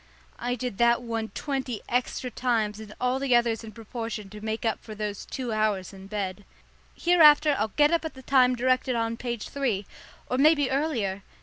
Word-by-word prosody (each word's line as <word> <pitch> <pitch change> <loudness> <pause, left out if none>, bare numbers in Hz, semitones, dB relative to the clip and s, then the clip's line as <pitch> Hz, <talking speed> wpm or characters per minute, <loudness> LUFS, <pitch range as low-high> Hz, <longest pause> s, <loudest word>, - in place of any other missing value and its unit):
I 245 +1 -1
did 245 -4 -5
that 235 +1 +4
one 225 -2 -3
twenty 265 -6 -3
extra 250 +1 -1
times 220 -4 0
and 215 -1 -9
all 250 +1 +1
the 270 -3 +2
others 235 -1 +2
in 220 - -8
proportion 220 -2 -6
to 210 0 -9
make 220 +1 -3
up 225 - 0
for 215 - -9
those 210 -1 -4
two 250 -4 -4
hours 210 -3 0
in 190 0 -11
bed. 200 -1 -4 0.5
Hereafter 305 -4 +6
I'll 215 - +1
get 295 +8 +3
up 335 -1 +2
at 320 - -5
the 260 - -12
time 255 -1 +4
directed 255 +1 +1
on 230 0 -1
page 235 -2 -5
three, 240 -8 -1 0.4
or 255 - -1
maybe 290 -2 +4
earlier. 245 -10 -1
235 Hz, 190 wpm, -27 LUFS, 215-260 Hz, 0.5 s, Hereafter